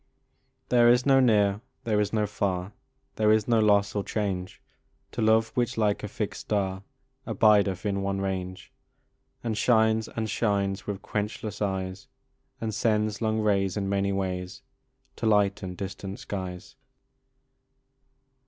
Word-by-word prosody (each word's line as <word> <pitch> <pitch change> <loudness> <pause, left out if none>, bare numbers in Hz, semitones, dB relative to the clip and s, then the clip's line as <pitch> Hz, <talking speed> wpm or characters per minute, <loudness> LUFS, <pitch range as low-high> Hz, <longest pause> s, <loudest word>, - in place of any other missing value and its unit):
There 120 -1 +5
is 125 +1 +4
no 135 -1 +5
near, 105 -5 +3 0.2
there 110 -2 +1
is 105 - -1
no 110 -1 +1
far, 100 -1 -2 0.4
There 110 -1 +4
is 110 -1 +3
no 115 -2 +3
loss 100 -1 +3
or 100 - -1
change, 100 -3 -3 0.5
To - - -4
love 110 +1 +4
which, 120 -3 -1
like 105 -2 +1
a 105 - -4
fixed 105 0 -4
star, 95 -2 -1 0.5
Abideth 105 -3 +3
in 100 -1 0
one 100 0 -1
range, 95 -1 -4 0.7
And 115 -2 -1
shines, 110 0 +3
and 110 -1 -4
shines, 100 -2 -1
with 100 -1 -4
quenchless 105 +1 -4
eyes, 95 0 -3 0.5
And 110 -1 -3
sends 105 0 0
long 110 -1 +1
rays 100 -2 +1
in 100 -1 -1
many 100 0 +1
ways 90 -2 -3 0.5
To 115 - -1
lighten 100 -3 +1
distant 100 +1 -6
skies. 95 -7 -6
105 Hz, 140 wpm, -27 LUFS, 95-110 Hz, 0.7 s, There